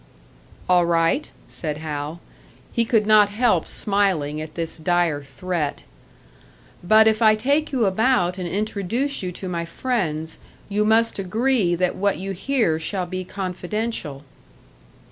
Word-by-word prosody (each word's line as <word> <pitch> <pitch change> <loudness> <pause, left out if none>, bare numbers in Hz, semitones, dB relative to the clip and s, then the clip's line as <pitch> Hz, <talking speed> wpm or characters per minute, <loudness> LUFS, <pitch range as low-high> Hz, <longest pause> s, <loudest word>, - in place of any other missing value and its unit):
"All 180 -1 +4
right," 165 - +1 0.2
said 150 -3 -5
Hal. 155 +1 -5 0.5
He 235 -2 +2
could 225 -2 +2
not 210 -1 +6
help 210 -5 +1
smiling 185 -8 0
at 155 0 -8
this 165 -1 -2
dire 170 -3 +1
threat. 145 +3 -3 1.0
"But 215 +5 +6
if 220 0 +2
I 215 -1 +6
take 285 +8 0
you 250 -5 +1
about 195 -3 +2
and 180 - -3
introduce 215 - -2
you 180 -1 -3
to 185 - -7
my 170 -2 -2
friends, 165 -5 -2 0.3
you 210 +1 +1
must 225 0 +3
agree 215 -1 +1
that 180 +1 0
what 200 +1 0
you 195 +1 -5
hear 195 -4 0
shall 180 +3 -2
be 185 +1 -4
confidential." 185 -4 -4
185 Hz, 140 wpm, -22 LUFS, 170-220 Hz, 1.0 s, not